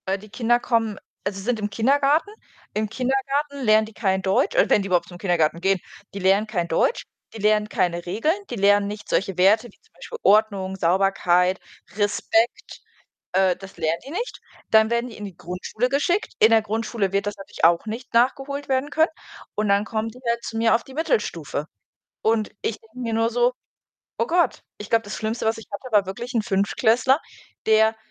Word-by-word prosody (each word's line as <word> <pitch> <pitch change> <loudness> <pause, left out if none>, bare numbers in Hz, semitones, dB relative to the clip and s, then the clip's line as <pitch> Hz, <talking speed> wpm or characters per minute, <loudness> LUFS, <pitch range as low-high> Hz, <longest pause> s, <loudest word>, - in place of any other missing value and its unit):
Äh, 190 +1 0
die 210 +2 -14
Kinder 240 +2 +1
kommen 225 -4 0 0.3
also, 195 0 -3
sind 225 +3 -1
im 210 0 -2
Kindergarten. 280 - +2 0.4
Im 215 0 -1
Kindergarten 270 +4 -1
lernen 215 -1 +4
die 220 - -13
kein 190 -3 0
Deutsch 190 0 +1
oder - - +4
wenn 210 - +5
die 195 - -4
überhaupt 180 -2 +1
zum 175 -1 -12
Kindergarten 170 -3 +1
gehen, 190 0 +2 0.4
die - - -3
lernen 195 +3 +3
kein 180 -6 -2
Deutsch, 170 - +1 0.3
die - - -5
lernen 210 0 +2
keine 175 -2 -1
Regeln, 225 - +1 0.2
die - - -4
lernen 205 0 +3
nicht 210 0 -7
solche 195 -2 -1
Werte 210 +6 +4
wie - - -28
zum 450 - -33
Beispiel 470 - -9
Ordnung, 200 -3 +3
Sauberkeit, 180 0 +2 0.4
Respekt, 210 +3 0 0.5
äh, 185 -1 +3
das 195 0 -13
lernen 160 +1 0
die - - -8
nicht. 440 +10 -4 0.3
Dann 220 0 +5
werden 235 +1 0
die 225 - -11
in 210 - -8
die 195 -3 -8
Grundschule 180 +8 -3
geschickt. 315 +9 0
In 220 - +6
der 225 -1 +6
Grundschule 220 -2 -2
wird 200 +1 0
das 205 - -3
natürlich 195 - -4
auch 170 +4 +4
nicht 230 +4 -6
nachgeholt 270 +4 +1
werden 265 +2 0
können. 320 +2 +3 0.5
Und 210 0 -1
dann 200 +1 +2
kommen 220 0 -2
die 250 - -15
halt 235 0 0
zu 225 - -4
mir 225 0 +4
auf 230 - 0
die 270 - -13
Mittelstufe. 325 - -2 0.5
Und 220 -1 +1
ich 225 - -3
denke 225 +2 -18
mir 230 -3 -2
nur 225 +1 +2
so: 245 +1 +2 0.6
„Oh - - +1
Gott.“ 345 -3 +1
Ich 210 - -9
glaube, 230 0 +3
das 205 - -6
Schlimmste, 220 +1 -3
was 225 - +1
ich 225 - -11
hatte, 250 +6 -7
war 210 -3 +4
wirklich 235 +7 -6
'n 230 - +2
Fünftklässler, 220 +7 +2 0.5
der 220 0 +4
220 Hz, 200 wpm, -23 LUFS, 195-240 Hz, 0.6 s, In